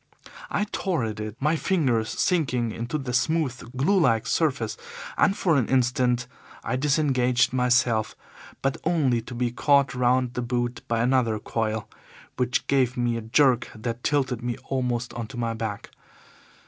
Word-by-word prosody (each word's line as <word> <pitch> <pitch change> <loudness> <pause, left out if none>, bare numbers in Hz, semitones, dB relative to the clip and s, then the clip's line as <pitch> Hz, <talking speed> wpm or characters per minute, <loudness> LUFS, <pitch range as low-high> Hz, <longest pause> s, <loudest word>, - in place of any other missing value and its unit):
I - - 0
tore 180 -10 -1
at 110 -2 -4
it, 105 0 -5
my 150 +4 +2
fingers 130 -11 +1
sinking 125 - 0
into 120 +7 -3
the 135 -4 -4
smooth, 130 -4 -1
glue 190 +9 +3
like 115 -9 +2
surface, 130 -9 0 0.4
and 195 - +3
for 165 -5 +2
an 130 - +1
instant 125 -1 +2 0.4
I - - -1
disengaged 130 -3 +2
myself, 120 -3 +2 0.5
but 135 0 0
only 145 -8 +2
to 120 +2 -9
be 120 0 0
caught 140 +2 +3
round 125 0 +1
the 125 - -2
boot 120 0 -2
by 115 -1 0
another 125 -3 +2
coil, 110 0 -2 0.5
which 125 0 0
gave 130 -2 +1
me 120 -1 +1
a 115 - -3
jerk 125 +2 +3
that 115 +2 -5
tilted 130 -5 0
me 120 0 -3
almost 125 -2 -1
on 120 -2 -5
to 115 - -10
my 115 -1 -1
back. 110 -2 -5
125 Hz, 160 wpm, -25 LUFS, 115-135 Hz, 0.5 s, glue